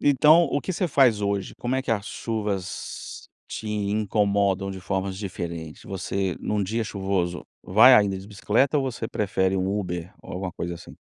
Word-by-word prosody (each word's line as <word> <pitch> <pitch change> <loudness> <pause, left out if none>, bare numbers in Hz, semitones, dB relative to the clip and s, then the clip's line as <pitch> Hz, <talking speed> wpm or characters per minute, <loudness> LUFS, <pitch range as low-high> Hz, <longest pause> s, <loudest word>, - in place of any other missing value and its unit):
Então, 150 +4 +6
o 145 - -1
que 185 - -3
você 180 +1 0
faz 130 -7 +4
hoje? 100 -1 -1
Como 125 +1 -2
é 130 - 0
que - - -4
as 105 -3 0
chuvas 105 -5 -4 0.2
te 110 - -6
incomodam 100 -2 +1
de 95 -1 -7
formas 95 0 -2
diferentes? 85 -5 -6
Você, 95 -1 -2
num 105 -1 -1
dia 110 +4 -1
chuvoso, 95 -4 -2 0.2
vai 115 +7 +7
ainda 100 -4 +3
de 95 - -10
bicicleta 110 +8 +1
ou 135 - 0
você 115 -2 -5
prefere 95 -2 0
um 95 +2 0
Uber 90 -2 -4
ou - - -10
alguma 90 -1 -4
coisa 85 +1 -4
assim? 85 - -12
100 Hz, 180 wpm, -25 LUFS, 95-110 Hz, 0.2 s, vai